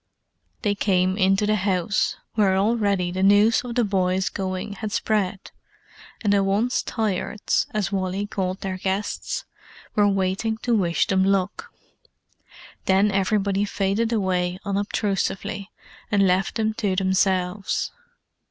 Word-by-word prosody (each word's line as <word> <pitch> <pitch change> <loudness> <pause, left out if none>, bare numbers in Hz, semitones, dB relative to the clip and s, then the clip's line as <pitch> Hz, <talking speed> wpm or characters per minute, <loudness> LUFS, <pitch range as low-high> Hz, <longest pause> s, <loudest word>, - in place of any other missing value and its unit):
They 205 -3 +2
came 185 -2 +1
into 195 +1 +2
the 215 0 +2
house, 190 0 0 0.2
where 195 -3 +3
already 200 -4 +1
the 185 +1 -3
news 205 +5 +5
of 240 -1 -6
the 245 - +3
boys' 190 -2 +1
going 190 +1 -4
had 215 +1 -5
spread, 205 -4 -1 0.7
and 205 -2 +3
the 200 -1 +3
"Once 205 +6 +1
Tired's," 215 -2 -1
as 210 -3 -2
Wally 190 +1 -1
called 190 -2 -3
their 190 -1 -4
guests, 200 - -2 0.5
were 205 -1 +4
waiting 195 +3 0
to 240 -1 +2
wish 175 -5 +2
them 190 -1 +2
luck. 195 - 0 1.2
Then 195 +2 +3
everybody 195 0 +1
faded 200 +3 0
away 185 -4 0
unobtrusively, 200 0 -2 0.4
and 200 -2 +4
left 185 +1 +1
them 220 -1 0
to 200 -5 0
themselves. 190 0 0
195 Hz, 130 wpm, -23 LUFS, 190-210 Hz, 1.2 s, news